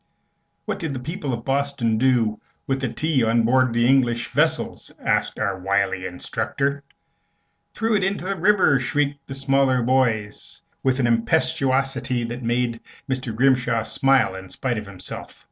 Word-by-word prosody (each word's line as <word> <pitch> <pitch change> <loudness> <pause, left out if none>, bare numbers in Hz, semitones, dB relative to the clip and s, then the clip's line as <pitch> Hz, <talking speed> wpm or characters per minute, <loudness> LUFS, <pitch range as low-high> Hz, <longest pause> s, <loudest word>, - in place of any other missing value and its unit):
"What - - -3
did 160 -4 -3
the - - -3
people 155 +2 -4
of 115 -1 -4
Boston 135 -5 0
do 120 -4 +2 0.2
with 135 0 -1
the 125 -4 -1
tea 145 +1 +1
on 115 +1 +3
board 130 +2 +3
the 120 0 +2
English 120 -3 +2
vessels?" - - 0
asked - - 0
our 95 -1 -1
wily 95 0 0
instructor. 140 +10 -2 0.9
"Threw 225 0 0
it 195 - +1
into 195 -1 -1
the 195 +1 -1
river!" 190 -9 +4
shrieked 140 +2 -1
the 135 - -5
smaller 135 -2 +2
boys, 115 -5 0 0.2
with 130 0 +1
an 125 - +2
impetuosity 130 0 +1
that 120 +2 -5
made 120 0 -1 0.3
Mr. 130 -4 -3
Grimshaw 125 -2 +2
smile 135 -3 +2
in 95 0 -9
spite 120 +1 -2
of 105 - -9
himself. 95 -2 -9
130 Hz, 155 wpm, -23 LUFS, 115-135 Hz, 0.9 s, river